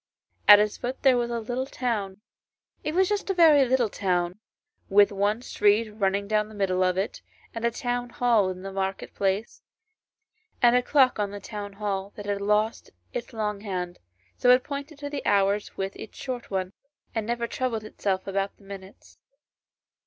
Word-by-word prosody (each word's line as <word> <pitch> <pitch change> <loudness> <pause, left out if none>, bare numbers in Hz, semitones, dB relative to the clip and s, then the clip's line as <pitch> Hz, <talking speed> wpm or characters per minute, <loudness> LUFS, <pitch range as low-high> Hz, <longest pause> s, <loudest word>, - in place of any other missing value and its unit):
At 205 - +11
its 210 0 +1
foot 250 +2 -5
there 265 -2 +6
was 240 -1 0
a 235 -1 -2
little 245 +4 -3
town; 210 -8 -3 0.6
it 305 - -2
was 375 +1 +4
just 410 0 -2
a 390 - +1
very 310 -5 +6
little 250 -2 +2
town, 180 -2 -1 0.5
with 205 +1 +5
one 205 +4 0
street 210 -1 +2
running 200 -1 0
down 215 0 +1
the 215 - -12
middle 190 -2 0
of 185 0 +1
it, 195 +2 -2 0.3
and 230 - -5
a 235 - +3
town 245 +1 -3
hall 230 -5 +2
in 185 0 -6
the 195 - -5
market 195 0 -3
place, 195 +3 -1 1.0
and 240 -1 +5
a 250 - +4
clock 260 -2 +3
on 205 -1 0
the 205 0 -7
town 205 0 -7
hall 200 -1 -3
that 205 - -8
had 200 -1 -2
lost 210 +2 0 0.2
its - - -5
long 210 -3 -3
hand, 180 -4 -4 0.4
so 245 - +3
it 250 0 +6
pointed 285 +1 -6
to 285 0 -6
the 285 - -4
hours 200 +1 +1
with 195 0 -3
its - - -10
short 250 -2 -5
one, 190 -1 -2 0.4
and 220 -2 -2
never 235 0 -1
troubled 235 -2 -2
itself 195 -3 -2
about 195 0 -2
the - - -21
minutes. 195 -1 -12
210 Hz, 185 wpm, -26 LUFS, 195-245 Hz, 1.0 s, At